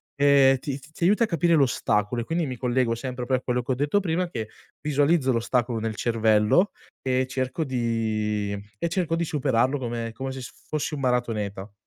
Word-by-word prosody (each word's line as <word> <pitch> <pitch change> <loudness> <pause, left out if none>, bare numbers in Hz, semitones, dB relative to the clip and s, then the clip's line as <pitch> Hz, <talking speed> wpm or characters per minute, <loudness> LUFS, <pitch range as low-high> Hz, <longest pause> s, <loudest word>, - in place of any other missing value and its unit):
ehm, 140 -2 +5
ti 140 +1 -5
ti 155 +4 -17
ti 170 - -6
aiuta 210 +5 +4
a - - -7
capire 170 -2 +2
l'ostacolo, 120 -5 +1
e - - -3
quindi, 165 +3 0
mi 130 - -5
collego 125 0 +1
sempre 125 +1 -5
pro 130 +1 +1
a - - -7
quello 125 -1 -1
che 125 - -3
ho - - +2
detto 145 +9 +1
prima, 180 -1 -1
che 110 -7 -5 0.3
visualizzo 145 -1 +2
l'ostacolo 120 0 0
nel 110 0 -3
cervello, 110 - +3 0.3
e 130 0 +1
cerco 130 +4 -2
di 110 -5 -1 0.3
e 170 - 0
cerco 165 -2 0
di 170 0 0
superarlo 135 -3 +1
come 115 -2 -3
come 135 +2 -4
se 130 0 -6
s - - -8 0.2
fossi 155 0 -2
un 145 - -5
maratoneta. 110 -6 -1
130 Hz, 195 wpm, -25 LUFS, 115-145 Hz, 0.3 s, ehm